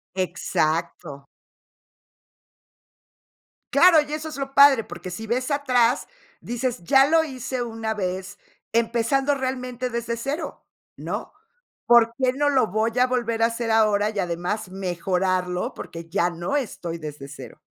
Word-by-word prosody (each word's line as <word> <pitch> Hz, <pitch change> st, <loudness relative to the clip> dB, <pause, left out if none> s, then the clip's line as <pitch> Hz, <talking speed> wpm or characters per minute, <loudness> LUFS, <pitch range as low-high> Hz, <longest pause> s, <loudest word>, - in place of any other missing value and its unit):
Exacto. 160 Hz, -5 st, -2 dB, 2.4 s
Claro, 330 Hz, +2 st, +7 dB
y 295 Hz, -, -8 dB
eso 310 Hz, +1 st, -4 dB
es 310 Hz, -, -7 dB
lo 275 Hz, -1 st, -5 dB
padre, 275 Hz, -4 st, +7 dB
porque 185 Hz, -3 st, -8 dB
si 220 Hz, +5 st, -7 dB
ves 255 Hz, +4 st, -1 dB
atrás, 255 Hz, -4 st, +2 dB, 0.4 s
dices: 240 Hz, -5 st, -3 dB
"Ya 270 Hz, +10 st, +5 dB
lo 325 Hz, +1 st, +4 dB
hice 260 Hz, -3 st, -4 dB
una 225 Hz, -1 st, -3 dB
vez, 190 Hz, 0 st, -4 dB, 0.4 s
empezando 240 Hz, +5 st, +1 dB
realmente 255 Hz, -2 st, -3 dB
desde 235 Hz, 0 st, -3 dB
0, 275 Hz, +7 st, -5 dB, 0.3 s
¿no? -, -, -5 dB, 0.5 s
¿Por 235 Hz, -1 st, +5 dB
qué 255 Hz, -1 st, +1 dB
no 290 Hz, +2 st, +1 dB
lo 265 Hz, -5 st, +3 dB
voy 220 Hz, +4 st, 0 dB
a 250 Hz, -, +5 dB
volver 235 Hz, -3 st, -1 dB
a -, -, +7 dB
hacer 230 Hz, 0 st, -3 dB
ahora 215 Hz, -2 st, +3 dB
y 215 Hz, -2 st, -4 dB
además 180 Hz, +4 st, -2 dB
mejorarlo?, 185 Hz, -1 st, -1 dB
porque 165 Hz, 0 st, -9 dB
ya 175 Hz, 0 st, +1 dB
no 175 Hz, +10 st, -2 dB
estoy 175 Hz, -, -4 dB
desde 150 Hz, -3 st, -8 dB
0". 145 Hz, -, -11 dB
230 Hz, 140 wpm, -24 LUFS, 185-260 Hz, 2.4 s, Claro